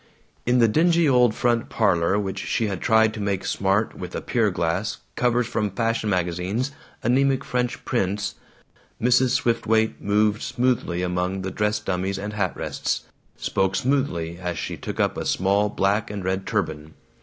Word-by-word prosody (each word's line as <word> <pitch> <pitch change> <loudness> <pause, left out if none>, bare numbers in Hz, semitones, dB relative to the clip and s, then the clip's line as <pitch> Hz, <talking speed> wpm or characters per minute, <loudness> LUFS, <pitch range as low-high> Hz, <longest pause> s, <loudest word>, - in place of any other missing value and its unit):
In 125 +1 +4
the 115 -2 +5
dingy 170 +7 +3
old 125 -4 +4
front 120 -1 +1
parlor 85 +2 +2
which 100 -2 -2
she 115 - -1
had 100 -4 -3
tried 110 -1 +4
to - - -6
make 100 -2 -1
smart 100 +3 +1
with 90 -1 -7
a - - -3
pier 115 -3 +1
glass, 90 +3 -1 0.2
covers 120 0 +2
from 110 -2 -1
fashion 115 +1 -1
magazines, 90 +7 -1 0.3
anemic 135 +3 +2
French 125 -2 -2
prints, 100 -4 -1 0.7
Mrs. 125 +2 +3
Swiftwaite 110 -1 +1
moved 105 +1 +2
smoothly 120 -8 0
among 90 +1 -1
the 95 - -3
dress 105 +1 0
dummies 95 -1 -2
and 105 +2 -5
hat 100 -4 -1
rests, - - -2 0.3
spoke 95 0 0
smoothly 90 -12 0
as 90 -2 -3
she - - -4
took - - -6
up - - +1
a - - -2
small 100 +3 +2
black 100 +1 0
and 105 -2 -5
red 95 +1 -1
turban. 80 -8 -2
105 Hz, 165 wpm, -24 LUFS, 95-120 Hz, 0.7 s, the